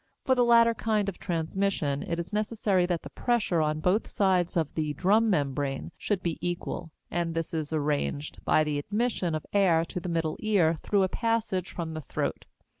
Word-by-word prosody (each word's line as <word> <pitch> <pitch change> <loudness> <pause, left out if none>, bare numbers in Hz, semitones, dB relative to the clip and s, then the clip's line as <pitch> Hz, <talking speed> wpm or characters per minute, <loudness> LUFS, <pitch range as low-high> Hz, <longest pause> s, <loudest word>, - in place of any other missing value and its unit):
For 260 - +4
the 250 -1 +3
latter 230 -1 +6
kind 215 -3 0
of 190 - -9
transmission 165 -4 -1
it 170 - -3
is 170 +2 -5
necessary 210 -4 +1
that 175 -2 -1
the - - -9
pressure 225 -9 +1
on 155 0 0
both 185 +7 +2
sides 185 -3 +1
of 160 -3 0
the 150 -2 -2
drum 210 +8 +3
membrane 140 -5 -1
should 200 -4 -2
be 170 -2 -2
equal, 175 -1 -3 0.2
and 170 -1 -1
this 165 0 -2
is 155 -2 -2
arranged 150 -1 -2
by 155 - +4
the 150 -1 -1
admission 205 -1 -1
of 155 - -4
air 175 -5 +4
to 180 - -5
the 180 0 -5
middle 165 -2 -1
ear 175 -7 +2
through 200 -2 +2
a - - +3
passage 225 -4 -1
from 165 -2 -5
the 155 - -5
throat. - - -3
175 Hz, 190 wpm, -28 LUFS, 160-205 Hz, 0.2 s, latter